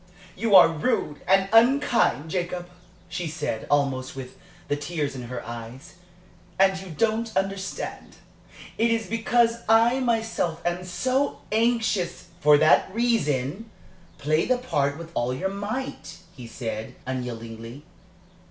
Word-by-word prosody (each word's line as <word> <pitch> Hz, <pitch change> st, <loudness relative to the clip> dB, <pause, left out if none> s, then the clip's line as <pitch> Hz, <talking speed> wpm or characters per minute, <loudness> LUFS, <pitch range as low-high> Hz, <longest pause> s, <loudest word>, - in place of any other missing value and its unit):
"You 220 Hz, -3 st, +2 dB
are 180 Hz, -, +10 dB
rude 165 Hz, -2 st, -1 dB
and 195 Hz, 0 st, +4 dB
unkind, 235 Hz, -, +3 dB
Jacob," 175 Hz, -1 st, -3 dB, 0.4 s
she 175 Hz, -1 st, -4 dB
said, 150 Hz, -7 st, -4 dB
almost 135 Hz, -3 st, 0 dB
with 130 Hz, -1 st, -8 dB, 0.3 s
the 145 Hz, -, 0 dB
tears 145 Hz, -1 st, -3 dB
in 125 Hz, -2 st, -6 dB
her 120 Hz, 0 st, -6 dB
eyes. 120 Hz, +7 st, -9 dB, 0.6 s
"And 195 Hz, 0 st, +4 dB
you 190 Hz, -, -10 dB
don't 225 Hz, +6 st, 0 dB
understand 195 Hz, 0 st, -4 dB, 0.6 s
it 230 Hz, +1 st, +3 dB
is 225 Hz, -1 st, 0 dB
because 230 Hz, +1 st, +2 dB
I 230 Hz, +3 st, +5 dB
myself 225 Hz, -9 st, 0 dB
am 175 Hz, +1 st, -1 dB
so 260 Hz, +9 st, -1 dB
anxious 220 Hz, -6 st, 0 dB
" 170 Hz, -, -27 dB
"For 150 Hz, 0 st, +7 dB
that 155 Hz, +5 st, +4 dB
reason, 220 Hz, -, 0 dB, 0.5 s
play 155 Hz, +3 st, +1 dB
the 255 Hz, -, +3 dB
part 145 Hz, -, -1 dB
with 165 Hz, 0 st, -9 dB
all 125 Hz, -2 st, -1 dB
your 190 Hz, +9 st, -2 dB
might," 210 Hz, +7 st, -5 dB, 0.2 s
he 125 Hz, -4 st, -9 dB
said, 110 Hz, -2 st, -5 dB
unyieldingly. 120 Hz, 0 st, -6 dB
175 Hz, 135 wpm, -25 LUFS, 140-225 Hz, 0.6 s, are